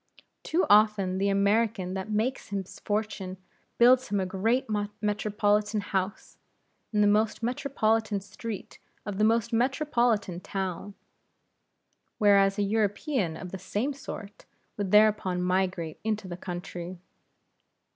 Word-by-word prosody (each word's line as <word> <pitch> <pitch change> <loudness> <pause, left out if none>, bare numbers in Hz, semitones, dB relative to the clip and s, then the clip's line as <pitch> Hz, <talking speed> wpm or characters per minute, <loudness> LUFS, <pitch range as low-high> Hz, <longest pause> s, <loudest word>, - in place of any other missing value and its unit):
Too 345 +3 +1
often 205 -3 +4
the 200 +1 +2
American 200 -1 +1
that 190 0 -4
himself 215 - -2
makes 255 +5 -1
his 195 -2 -5
fortune, 205 -3 -3 0.4
builds 250 +2 +6
him 205 - 0
a 190 - 0
great 220 +7 0 0.3
metropolitan 210 0 +1
house, 195 0 -3 0.5
in 210 -1 +2
the 205 - +5
most 215 +2 +2
metropolitan 225 -4 0
street 205 +1 -8 0.3
of 205 -1 -4
the - - +3
most 225 +1 +2
metropolitan 240 - +1
town. 190 +1 -4 1.2
Whereas 200 -2 +4
a 205 - +1
European 205 - 0
of 180 - -8
the 190 - -6
same 210 +9 -2
sort 215 -6 -9 0.3
would 200 -2 -3
thereupon 210 -3 +4
migrate 180 -3 -1
into 215 -2 -2
the 175 - -5
country. 175 0 -6
205 Hz, 125 wpm, -28 LUFS, 190-220 Hz, 1.2 s, builds